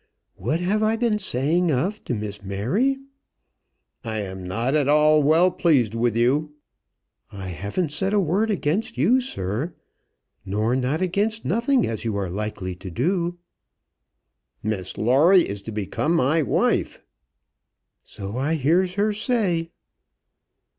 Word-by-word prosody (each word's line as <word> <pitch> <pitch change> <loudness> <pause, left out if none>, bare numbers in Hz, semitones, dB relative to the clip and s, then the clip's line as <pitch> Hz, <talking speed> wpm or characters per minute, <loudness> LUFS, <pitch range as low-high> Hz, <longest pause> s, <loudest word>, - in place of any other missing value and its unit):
"What 160 - -1
have 200 +4 +1
I 215 +1 +2
been 225 -2 +1
saying 165 +1 +1
of 185 +11 -1
to 125 - -2
Miss 105 -1 -5
Mary?" 125 - 0 1.1
"I 110 -2 -3
am 95 -2 -6
not 115 +9 -1
at 150 -3 +2
all 150 +1 +5
well 160 +5 +4
pleased 140 - +2
with 115 -1 0
you." 145 +6 +1 0.8
"I 95 -2 -7
haven't 100 - -3
said 190 +6 -1
a 210 - +3
word 195 +5 +1
again 185 -1 +1
you, 190 - +3
sir, 125 - -3 0.7
nor 105 +5 0
not 130 +7 0
again 200 +4 +1
nothing 240 +6 +2
as 110 - -4
you 110 -3 -2
are 95 -3 -2
likely 100 -2 -4
to 95 - -8
do." 175 - -1 1.3
"Miss 100 -4 -3
Lawrie 150 - +5
is 100 0 -5
to 110 - -7
become 110 - -1
my 160 +1 +3
wife." 145 - 0 1.0
"So 100 +3 -7
I 150 +5 0
hears 175 +6 +2
her 210 +1 +1
say." 200 -7 0
150 Hz, 140 wpm, -23 LUFS, -, 1.3 s, all